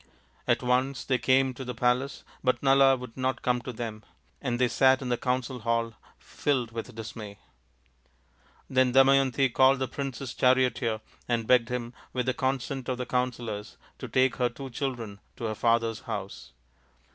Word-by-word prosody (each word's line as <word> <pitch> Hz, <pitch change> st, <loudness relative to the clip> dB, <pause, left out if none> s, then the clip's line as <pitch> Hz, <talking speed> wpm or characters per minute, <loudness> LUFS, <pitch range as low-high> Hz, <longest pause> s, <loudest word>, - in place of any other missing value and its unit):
At -, -, +2 dB
once 125 Hz, +2 st, +1 dB
they 130 Hz, -2 st, +1 dB
came 130 Hz, 0 st, +3 dB
to 130 Hz, -, -7 dB
the 125 Hz, -1 st, -5 dB
palace, 125 Hz, +3 st, 0 dB, 0.2 s
but 125 Hz, +1 st, +1 dB
Nala 135 Hz, -1 st, +5 dB
would 125 Hz, -2 st, -9 dB
not 130 Hz, 0 st, -2 dB
come 125 Hz, -1 st, +1 dB
to 125 Hz, -, -6 dB
them, 110 Hz, -2 st, -6 dB, 0.4 s
and 120 Hz, -4 st, -1 dB
they 125 Hz, 0 st, +3 dB
sat 130 Hz, +2 st, +4 dB
in 125 Hz, -, -4 dB
the 120 Hz, -, +2 dB
council 125 Hz, +1 st, -2 dB
hall 115 Hz, 0 st, 0 dB, 0.2 s
filled 130 Hz, -5 st, -2 dB
with 115 Hz, +1 st, -6 dB
dismay. 110 Hz, -2 st, -8 dB, 1.3 s
Then 130 Hz, -1 st, +2 dB
Damayanti 135 Hz, -1 st, +4 dB
called 135 Hz, +1 st, +5 dB
the 130 Hz, 0 st, -1 dB
prince's 135 Hz, -1 st, -5 dB
charioteer 125 Hz, -3 st, +2 dB, 0.3 s
and 115 Hz, -2 st, 0 dB
begged 120 Hz, 0 st, +4 dB
him, 125 Hz, -1 st, -4 dB, 0.2 s
with 125 Hz, -1 st, -1 dB
the 130 Hz, -, +1 dB
consent 130 Hz, -1 st, -2 dB
of 130 Hz, -, -1 dB
the 125 Hz, -, -3 dB
counsellors, 120 Hz, -5 st, -3 dB, 0.2 s
to -, -, -6 dB
take 130 Hz, 0 st, +2 dB
her 125 Hz, -2 st, +2 dB
two 135 Hz, +2 st, -9 dB
children 120 Hz, -6 st, -4 dB, 0.2 s
to -, -, -9 dB
her 110 Hz, -1 st, -1 dB
father's 115 Hz, 0 st, +1 dB
house. -, -, -7 dB
125 Hz, 170 wpm, -28 LUFS, 115-130 Hz, 1.3 s, Nala